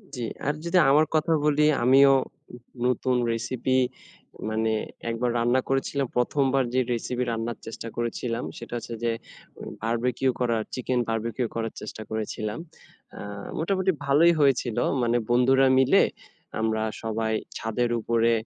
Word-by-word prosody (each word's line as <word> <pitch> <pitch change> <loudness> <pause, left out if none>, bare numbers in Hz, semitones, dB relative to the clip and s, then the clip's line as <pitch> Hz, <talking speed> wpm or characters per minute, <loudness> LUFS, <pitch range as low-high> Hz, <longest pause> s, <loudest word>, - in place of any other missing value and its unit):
জি। 125 - -5 0.3
আর 145 - +2
যদি 175 +2 +2
আমার 155 +2 +5
কথা 160 +1 +2
বলি 150 0 +3 0.2
আমিও 135 +2 +7 0.7
নতুন 125 0 +1 0.2
রেসিপি, 125 +3 -1 0.7
মানে 110 0 0 0.4
একবার 120 +2 -1
রান্না 120 +2 +2
করেছিলাম 135 0 0
প্রথমবার 135 +1 +2
যে 130 - +3
রেসিপি 125 +2 -2
রান্নার 115 +1 -3
চেষ্টা 115 +1 -7
করেছিলাম 120 0 -2
সেটা 120 0 -9
হচ্ছে 115 0 -7
যে 115 - +2 0.5
উ - - -10 0.2
বারবিকিউ 120 +3 0
করার, 115 -3 +1
চিকেন 125 0 -1
বারবিকিউ 115 +2 -1
করার 115 -1 -2
চেষ্টা 110 +1 -7
করেছিলাম। 110 +1 -3 0.6
আ - - -8 0.4
মোটামুটি 190 +2 +1
ভালোই 160 +5 +5
হয়েছিল। 130 -5 +2 0.3
মানে 120 +1 +2
বন্ধুরা 130 +2 +4
মিলে 130 - +5 0.6
আমরা 110 0 0 0.2
সবাই 110 0 -1 0.2
ছাদের 115 +2 -1
উপরে 115 +1 +2
120 Hz, 135 wpm, -26 LUFS, 115-135 Hz, 0.7 s, আমিও